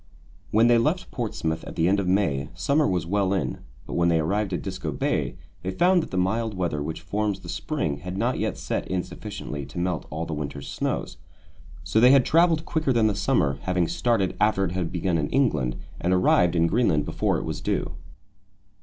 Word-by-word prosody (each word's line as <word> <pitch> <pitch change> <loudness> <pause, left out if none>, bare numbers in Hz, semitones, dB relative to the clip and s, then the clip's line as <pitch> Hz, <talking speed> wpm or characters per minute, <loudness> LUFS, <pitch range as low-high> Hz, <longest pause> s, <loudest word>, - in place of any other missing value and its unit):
When 110 +2 +4
they 120 -1 +5
left 155 +10 0
Portsmouth 80 -9 -3
at - - -8
the 85 -1 +2
end 100 +2 +3
of 95 - -1
May, 80 -7 +1
summer 150 +1 +2
was 90 -3 0
well 100 +1 +1
in; 95 - -2 0.3
but - - -7
when 85 0 +2
they 85 - +3
arrived 100 +5 0
at 90 - -2
Disko - - -4
Bay - - -1 0.3
they 90 - -3
found 175 - +3
that - - -6
the 95 - -4
mild 105 +4 0
weather 85 -5 -1
which 80 +2 -4
forms 100 +4 -2
the - - -10
spring 80 - -2
had 90 +5 -6
not - - 0
yet - - -1
set - - -3
in 90 -1 -1
sufficiently 75 -1 -7
to 70 - -11
melt 85 -3 -2
all 80 +3 -4
the 80 - -4
winter's 70 -2 -5
snows. - - -3 0.7
So 110 - +1
that 120 - +7
they - - +7
had 135 -3 +5
travelled 165 -1 +3
quicker 155 -4 0
than 115 -3 +3
the 105 - +3
summer, 70 -8 +1
having 90 -2 0
started 95 +3 0
after 105 -2 +3
it 85 - -3
had 90 -2 -2
begun 90 -1 0
in 75 - -1
England, 75 - +1 0.2
and 90 - 0
arrived 90 -1 +3
in 85 -1 +3
Greenland 85 -6 +2
before - - 0
it - - -4
was - - -4
due. - - -1
95 Hz, 215 wpm, -25 LUFS, 80-110 Hz, 0.7 s, that